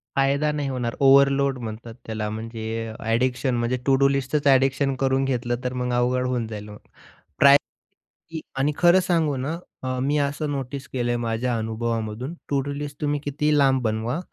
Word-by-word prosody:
फायदा 140 Hz, +2 st, +2 dB
नाही 145 Hz, -2 st, -2 dB
होणार 125 Hz, -3 st, -3 dB
ओव्हरलोड 140 Hz, 0 st, +4 dB
म्हणतात 115 Hz, 0 st, -7 dB
त्याला 110 Hz, -1 st, -3 dB
म्हणजे 110 Hz, +1 st, -6 dB, 0.2 s
अ, 110 Hz, -, -8 dB
ॲडिक्शन 125 Hz, +3 st, 0 dB
म्हणजे 120 Hz, +2 st, 0 dB
टू-डू 135 Hz, 0 st, +4 dB
लिस्टच 140 Hz, +2 st, 0 dB
ॲडिक्शन 135 Hz, 0 st, +3 dB
करून 135 Hz, 0 st, +1 dB
घेतलं 120 Hz, -2 st, -1 dB
तर 125 Hz, 0 st, -2 dB
मग 125 Hz, 0 st, -2 dB
अवघड 125 Hz, +1 st, +1 dB
होऊन 125 Hz, -3 st, -1 dB
जाईल. 105 Hz, -1 st, -7 dB
मग 105 Hz, -, -10 dB, 0.6 s
प्रायोरिटी 140 Hz, +1 st, +5 dB, 0.8 s
आणि 145 Hz, +2 st, +2 dB
खरं 175 Hz, +1 st, +6 dB
सांगू 165 Hz, -5 st, +1 dB
ना 150 Hz, +6 st, -3 dB, 0.3 s
अ, 130 Hz, 0 st, -2 dB
मी 145 Hz, +3 st, +1 dB
असं 145 Hz, +1 st, -1 dB
नोटीस 140 Hz, 0 st, -5 dB
केलंय 120 Hz, -1 st, 0 dB
माझ्या 115 Hz, +1 st, -1 dB
अनुभवामधून 115 Hz, +4 st, -3 dB, 0.2 s
टू-डू 140 Hz, 0 st, -1 dB
लिस्ट 145 Hz, 0 st, -7 dB
तुम्ही 145 Hz, -1 st, 0 dB
कितीही 150 Hz, +1 st, +1 dB
लांब 135 Hz, -2 st, +3 dB
बनवा 110 Hz, +7 st, -1 dB
130 Hz, 165 wpm, -24 LUFS, 120-140 Hz, 0.8 s, खरं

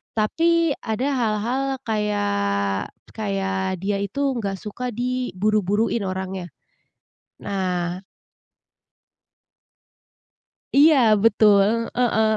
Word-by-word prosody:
tapi, 330 Hz, +9 st, +2 dB
ada 225 Hz, +5 st, -1 dB
hal-hal 230 Hz, +2 st, 0 dB, 0.3 s
kayak 100 Hz, -, 0 dB, 0.3 s
kayak 195 Hz, -3 st, -2 dB
dia 200 Hz, 0 st, 0 dB
itu 200 Hz, +8 st, -5 dB, 0.2 s
enggak 200 Hz, -4 st, -2 dB
suka 220 Hz, +6 st, -5 dB
diburu-buruin 215 Hz, -3 st, 0 dB
orangnya. 190 Hz, -1 st, -4 dB, 1.0 s
Nah 180 Hz, -3 st, -2 dB, 2.8 s
Iya, 300 Hz, +3 st, +6 dB, 0.3 s
betul, 215 Hz, +1 st, +4 dB
heeh. 220 Hz, -3 st, +2 dB
210 Hz, 75 wpm, -22 LUFS, 190-230 Hz, 2.8 s, Iya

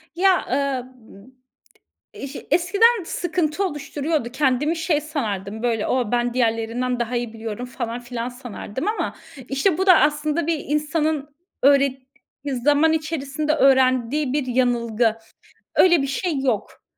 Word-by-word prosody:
Ya, 375 Hz, +1 st, +3 dB
ııı, 275 Hz, -3 st, 0 dB, 0.2 s
m 210 Hz, -1 st, -17 dB, 0.9 s
iş 275 Hz, +1 st, -6 dB
eskiden 400 Hz, +4 st, +3 dB
sıkıntı 345 Hz, +1 st, -1 dB
oluşturuyordu 295 Hz, -3 st, -3 dB
kendimi 285 Hz, +4 st, +1 dB
şey 320 Hz, -2 st, +1 dB
sanardım; 220 Hz, -, -4 dB
böyle, 230 Hz, -3 st, 0 dB
o 245 Hz, -4 st, 0 dB
ben 240 Hz, 0 st, 0 dB
diğerlerinden 240 Hz, +1 st, 0 dB
daha 240 Hz, +1 st, -1 dB
iyi 240 Hz, -2 st, -3 dB
biliyorum 225 Hz, +1 st, -6 dB
falan 235 Hz, -1 st, -5 dB
filan 240 Hz, -1 st, -5 dB
sanardım 245 Hz, -, -6 dB
ama 435 Hz, -, -2 dB, 0.3 s
işte 305 Hz, +6 st, +1 dB
bu 380 Hz, -, 0 dB
da 365 Hz, -3 st, +8 dB
aslında 300 Hz, +2 st, +1 dB
bir 330 Hz, -1 st, 0 dB
insanın 300 Hz, -1 st, -1 dB, 0.3 s
öğret 275 Hz, -1 st, +4 dB, 0.6 s
zaman 295 Hz, +2 st, +4 dB
içerisinde 305 Hz, -1 st, -2 dB
öğrendiği 265 Hz, -1 st, +3 dB
bir 290 Hz, -2 st, -1 dB
yanılgı. 235 Hz, -3 st, +1 dB, 0.6 s
Öyle 345 Hz, -4 st, +5 dB
bir 275 Hz, -, -1 dB
şey 295 Hz, +2 st, -2 dB
yok. 245 Hz, -6 st, -2 dB
275 Hz, 130 wpm, -22 LUFS, 240-310 Hz, 0.9 s, da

